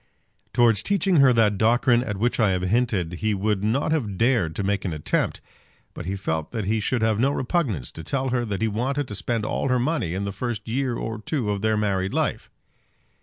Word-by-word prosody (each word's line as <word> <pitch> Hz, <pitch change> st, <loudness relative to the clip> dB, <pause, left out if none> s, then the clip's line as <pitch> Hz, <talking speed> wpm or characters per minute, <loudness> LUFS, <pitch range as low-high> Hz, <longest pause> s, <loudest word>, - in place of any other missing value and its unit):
Towards 115 Hz, -4 st, +4 dB
teaching 195 Hz, -3 st, +2 dB
her 135 Hz, -2 st, +6 dB
that 105 Hz, -4 st, +3 dB
doctrine 120 Hz, +2 st, +3 dB
at 105 Hz, -5 st, -4 dB
which 120 Hz, +5 st, 0 dB
I 105 Hz, -4 st, +3 dB
have 90 Hz, 0 st, -1 dB
hinted, 100 Hz, -4 st, 0 dB
he 110 Hz, -1 st, +1 dB
would 100 Hz, 0 st, 0 dB
not 120 Hz, +9 st, +1 dB
have 110 Hz, -12 st, -1 dB
dared 110 Hz, -10 st, +2 dB
to -, -, -2 dB
make 100 Hz, 0 st, 0 dB
an 90 Hz, -, -2 dB
attempt; 75 Hz, -1 st, -1 dB, 0.5 s
but 90 Hz, -, -7 dB
he 95 Hz, -, -2 dB
felt 80 Hz, -5 st, -3 dB
that 110 Hz, -4 st, -2 dB
he 110 Hz, +3 st, +1 dB
should 115 Hz, +2 st, -1 dB
have 110 Hz, -1 st, +2 dB
no 130 Hz, +4 st, +3 dB
repugnance 125 Hz, -, -1 dB
to 80 Hz, -, -9 dB
telling 130 Hz, -, -1 dB
her 120 Hz, -1 st, +1 dB
that 105 Hz, -1 st, -3 dB
he -, -, +3 dB
wanted 130 Hz, +6 st, -1 dB
to -, -, -5 dB
spend 115 Hz, +1 st, -2 dB
all -, -, -1 dB
her 130 Hz, -1 st, +2 dB
money 125 Hz, -, -1 dB
in 100 Hz, +1 st, -2 dB
the 100 Hz, -, -3 dB
first 110 Hz, 0 st, -4 dB
year 125 Hz, +1 st, -1 dB
or 110 Hz, -1 st, -4 dB
two 120 Hz, -4 st, -1 dB
of 100 Hz, -1 st, -2 dB
their 110 Hz, 0 st, +1 dB
married 100 Hz, -2 st, 0 dB
life! -, -, -1 dB
110 Hz, 220 wpm, -24 LUFS, 100-125 Hz, 0.5 s, her